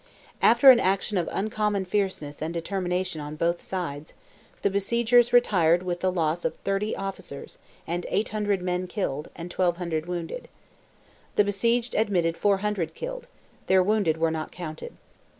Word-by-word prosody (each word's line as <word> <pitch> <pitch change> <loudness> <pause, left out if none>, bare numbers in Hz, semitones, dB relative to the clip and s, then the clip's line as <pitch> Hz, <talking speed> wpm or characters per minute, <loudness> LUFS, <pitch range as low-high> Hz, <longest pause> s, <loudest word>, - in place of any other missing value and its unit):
After 240 +4 +8
an 245 - +5
action 195 +1 0
of 170 - -2
uncommon 210 -1 -1
fierceness 185 -7 -2
and 160 +1 -2
determination 180 -1 -2
on 150 +1 -6
both 170 +2 0
sides, 155 -5 -5 0.5
the - - +3
besiegers 235 +4 +3
retired 180 -8 +4
with 175 -1 -2
the 185 0 +1
loss 170 -1 0
of - - -1
30 195 +2 -1
officers, 195 -7 -7 0.3
and 175 +1 -3
800 205 -2 0
men 180 0 -1
killed, 150 -7 -3
and 175 +1 -7
1,200 170 -3 -1
wounded. 175 - -5 0.9
The 210 - +5
besieged 230 +4 +1
admitted 180 -6 +1
400 200 -2 0
killed—their - - -2
wounded 200 -5 +1
were 165 0 +1
not 160 -1 -4
counted. 160 -3 -8
185 Hz, 140 wpm, -26 LUFS, 170-210 Hz, 0.9 s, After